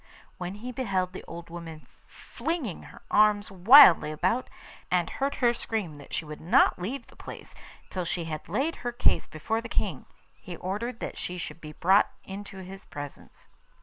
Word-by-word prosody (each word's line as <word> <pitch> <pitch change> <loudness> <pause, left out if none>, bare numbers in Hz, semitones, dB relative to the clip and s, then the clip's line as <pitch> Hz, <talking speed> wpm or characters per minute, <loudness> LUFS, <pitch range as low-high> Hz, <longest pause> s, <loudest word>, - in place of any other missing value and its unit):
When 180 +1 -4
he 240 +5 -6
beheld 190 -8 -1
the - - -7
old 170 0 -9
woman 165 -2 -8 0.2
flinging 310 - -4
her - - -15
arms 210 -1 +4
wildly 190 - +8
about, 185 +11 0 0.4
and 175 -2 +2
heard 275 +9 -2
her 240 -2 +3
scream 220 -8 -3
that 140 - -13
she 165 - -2
would 150 0 -8
not 170 - +4
leave 245 +10 -4
the - - -19
place - - -10 0.4
till 185 - -2
she 170 +1 -2
had 155 -1 -6
laid 275 - 0
her 245 - -3
case 240 - +2
before 220 +9 -2
the 230 - -8
King, - - -2 0.3
he 175 - -9
ordered 225 +6 -4
that - - -5
she 180 - -4
should 170 - -6
be 150 -1 -9
brought 190 +6 +4
into 195 -1 -8
his 190 +1 -10
presence. 145 -1 -10
190 Hz, 180 wpm, -28 LUFS, 170-230 Hz, 0.4 s, wildly